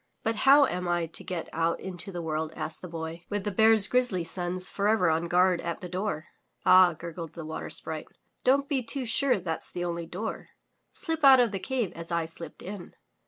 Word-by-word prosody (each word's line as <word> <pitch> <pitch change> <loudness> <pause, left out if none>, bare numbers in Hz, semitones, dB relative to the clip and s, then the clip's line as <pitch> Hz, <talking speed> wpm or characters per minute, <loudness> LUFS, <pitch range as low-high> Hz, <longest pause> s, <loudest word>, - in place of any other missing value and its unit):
"But 225 -1 0
how 275 +6 +6
am 180 -6 -3
I 175 -1 +1
to 165 - -7
get 175 -3 -4
out 165 +1 0
into 185 0 -5
the 175 -2 -5
world?" 155 0 -2
asked 160 - -5
the 180 - -7
Boy, 165 0 -6
"with 205 -1 -2
the 205 - -2
Bear's 220 +1 +5
grizzly 245 -8 +1
sons 180 +2 -2
forever 200 -4 +2
on 165 +2 0
guard 180 0 +3
at 170 - -4
the - - -8
only - - -17
door." 180 -4 -3 0.4
"Ah," 185 -1 +7
gurgled 165 0 -7
the 165 - -7
Water 160 - -5
Sprite, - - -4 0.4
"don't 275 +2 +3
be 275 -3 0
too 255 +2 -3
sure 250 0 +2
that's 165 -3 -3
the 175 0 -4
only 170 -1 -3
door. 200 +7 -5 0.4
Slip 325 -4 -4
out 270 -2 +9
of 240 -3 +3
the 195 - -3
cave 245 -4 -2
as 170 +1 -9
I 170 -1 0
slipped 165 +1 -10
in." 190 -2 -8
180 Hz, 210 wpm, -28 LUFS, 170-220 Hz, 0.4 s, out